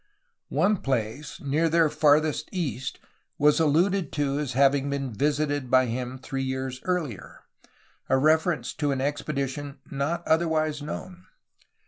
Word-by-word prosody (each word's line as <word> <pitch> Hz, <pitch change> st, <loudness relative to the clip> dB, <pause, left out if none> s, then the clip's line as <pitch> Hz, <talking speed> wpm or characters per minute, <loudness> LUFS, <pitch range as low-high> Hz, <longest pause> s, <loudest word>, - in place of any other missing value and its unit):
One 210 Hz, +1 st, +2 dB
place 130 Hz, 0 st, -3 dB
near 155 Hz, +4 st, +1 dB
their 165 Hz, 0 st, +4 dB
farthest 150 Hz, +1 st, +2 dB
east 130 Hz, -, -3 dB, 0.4 s
was 150 Hz, +1 st, +4 dB
alluded 165 Hz, +3 st, +2 dB
to 145 Hz, -1 st, 0 dB
as 140 Hz, -4 st, -3 dB
having 140 Hz, +1 st, +3 dB
been 135 Hz, -3 st, -3 dB
visited 145 Hz, +1 st, 0 dB
by 130 Hz, 0 st, +5 dB
him 125 Hz, +2 st, -4 dB
three 135 Hz, +1 st, -4 dB
years 130 Hz, -1 st, -3 dB
earlier, 165 Hz, -, -3 dB, 0.3 s
— -, -, -35 dB
a 130 Hz, -, +4 dB
reference 160 Hz, +4 st, +2 dB
to 145 Hz, -1 st, +2 dB
an 135 Hz, -, -1 dB
ex 145 Hz, +2 st, -1 dB
pedition 140 Hz, -1 st, -3 dB, 0.2 s
not 160 Hz, +5 st, -2 dB
otherwise 155 Hz, -2 st, +1 dB
known. 180 Hz, +4 st, -7 dB
145 Hz, 140 wpm, -26 LUFS, 135-155 Hz, 0.4 s, by